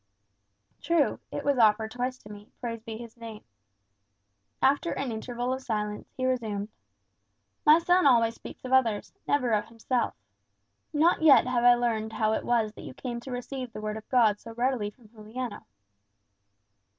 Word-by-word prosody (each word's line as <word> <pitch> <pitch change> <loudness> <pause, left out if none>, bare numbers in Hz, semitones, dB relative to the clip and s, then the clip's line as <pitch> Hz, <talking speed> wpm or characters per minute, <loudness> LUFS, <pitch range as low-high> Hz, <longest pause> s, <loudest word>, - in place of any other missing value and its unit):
"True; 335 -4 +2
it - - -5
was 285 -3 +2
offered 220 0 +4
twice 250 +2 -3
to 210 - -11
me, 205 0 -12
praised 230 -2 -5
be 225 -1 -6
his 230 -1 -10
name." 225 -2 -9 1.2
After 280 +5 +2
an 270 -3 -3
interval 245 +3 -3
of 260 - -4
silence, 210 -3 -3
he 255 - -1
resumed, 220 -5 -1 1.0
"My 305 +1 +9
son 355 -1 +3
always 230 -3 +4
speaks - - -11
of 255 - -3
others, 230 -6 +2
never 255 -4 +1
of 210 -1 +1
himself. 230 +1 -2 0.8
Not 320 +3 +3
yet 305 -5 +7
have 250 -1 0
I 245 0 +7
learned 225 -2 -1
how 220 -1 +1
it - - -2
was 225 -3 +1
that - - -11
you - - -9
came 240 -2 -5
to 255 +2 -9
receive 250 0 -5
the - - -6
Word 215 0 -3
of 220 - -9
God 220 -5 +4
so 230 -1 -11
readily 240 -3 0
from 220 +2 -20
Juliano." 220 +1 -7
235 Hz, 170 wpm, -28 LUFS, 220-255 Hz, 1.2 s, My